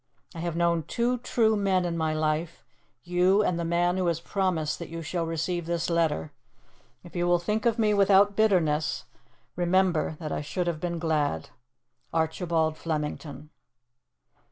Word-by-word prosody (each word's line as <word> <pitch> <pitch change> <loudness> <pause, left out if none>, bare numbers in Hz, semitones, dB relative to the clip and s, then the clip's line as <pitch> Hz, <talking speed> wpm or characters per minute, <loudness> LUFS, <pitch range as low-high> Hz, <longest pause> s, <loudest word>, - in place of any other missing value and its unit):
I 165 - -8
have 170 -1 -3
known 170 -1 +2
two 240 +1 0
true 225 -2 +2
men 190 -3 +1
in 170 -1 -2
my 160 -1 0
life 155 +2 -2 0.4
you 180 +4 +3
and 175 -4 0
the - - -1
man 175 +2 +1
who 185 -1 0
has 165 -1 0
promised 175 -5 -1
that 170 - -7
you 165 0 -6
shall 165 +1 -2
receive 165 +1 -2
this 170 0 -1
letter. 160 - 0 0.7
If 175 - -14
you 175 0 0
will 175 0 +4
think 210 +6 -1
of 230 0 +1
me 215 -2 +3
without 200 0 +5
bitterness, 170 -8 +2 0.5
remember 175 -3 +1
that 155 -3 -5
I - - -2
should 165 +5 -3
have 170 -3 -2
been 170 0 -3
glad. 150 - -1 0.6
"ARCHIBALD 160 -1 0
FLEMINGTON." 150 -2 -4
170 Hz, 160 wpm, -27 LUFS, 160-185 Hz, 0.7 s, without